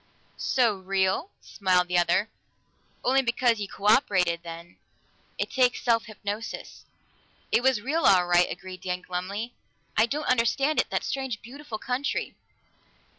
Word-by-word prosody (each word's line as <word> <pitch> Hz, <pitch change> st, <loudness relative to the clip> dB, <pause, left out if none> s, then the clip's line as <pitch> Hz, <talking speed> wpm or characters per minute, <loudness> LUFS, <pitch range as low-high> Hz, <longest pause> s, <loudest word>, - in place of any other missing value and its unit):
"So 235 Hz, -6 st, +1 dB
real?" 190 Hz, -, 0 dB
smiled 180 Hz, -2 st, +1 dB
the 180 Hz, 0 st, +2 dB
other. 175 Hz, +4 st, +2 dB, 0.8 s
"Only 265 Hz, +2 st, +4 dB
because 240 Hz, -2 st, +1 dB
you 205 Hz, -, -3 dB
co 195 Hz, -, -10 dB
operated, 185 Hz, -7 st, +3 dB
then. 170 Hz, 0 st, -9 dB, 0.6 s
It -, -, -2 dB
takes 250 Hz, -2 st, +2 dB
self 230 Hz, -2 st, +2 dB
hypnosis." 210 Hz, 0 st, -6 dB, 0.7 s
"It -, -, +4 dB
was 260 Hz, -4 st, +3 dB
real, 315 Hz, +6 st, 0 dB
all 185 Hz, -2 st, +6 dB
right," 175 Hz, 0 st, +4 dB
agreed 185 Hz, -1 st, -8 dB
Dan 180 Hz, -1 st, -3 dB
glumly. 200 Hz, +6 st, -4 dB, 0.4 s
"I 220 Hz, +2 st, +4 dB
don't 295 Hz, +4 st, -3 dB
understand 255 Hz, +5 st, +2 dB
it -, -, +1 dB
that -, -, -1 dB
strange 265 Hz, -5 st, -3 dB
beautiful 260 Hz, -1 st, -8 dB
country." 250 Hz, +5 st, -2 dB
215 Hz, 140 wpm, -27 LUFS, 185-250 Hz, 0.8 s, all